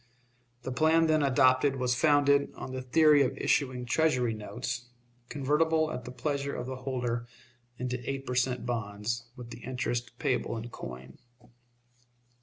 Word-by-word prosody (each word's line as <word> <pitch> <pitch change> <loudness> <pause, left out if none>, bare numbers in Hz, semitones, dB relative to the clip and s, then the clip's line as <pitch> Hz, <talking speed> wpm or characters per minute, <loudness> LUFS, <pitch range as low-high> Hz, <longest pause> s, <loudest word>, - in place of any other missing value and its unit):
The 130 - -4
plan 160 +5 +4
then 155 -1 +3
adopted 130 0 +4
was 125 -1 +1
founded 140 +1 +3
on 130 - -7
the 130 0 -4
theory 150 +3 +5
of 130 - 0
issuing 130 -3 0
Treasury 125 -3 +2
notes, 110 +3 -5 0.4
convertible 155 +3 +1
at 125 - -6
the 125 - -7
pleasure 140 +1 -2
of - - -4
the 130 0 -5
holder 125 -2 -3 0.5
into 125 0 -3
eight 135 0 -3
per 125 - -3
cent. 125 -1 0
bonds, 115 0 -3
with 120 -3 -10
the 115 - -8
interest 120 -1 -3
payable 125 -3 -1
in 115 +2 -6
coin. 65 - -9
125 Hz, 150 wpm, -29 LUFS, 120-140 Hz, 0.5 s, theory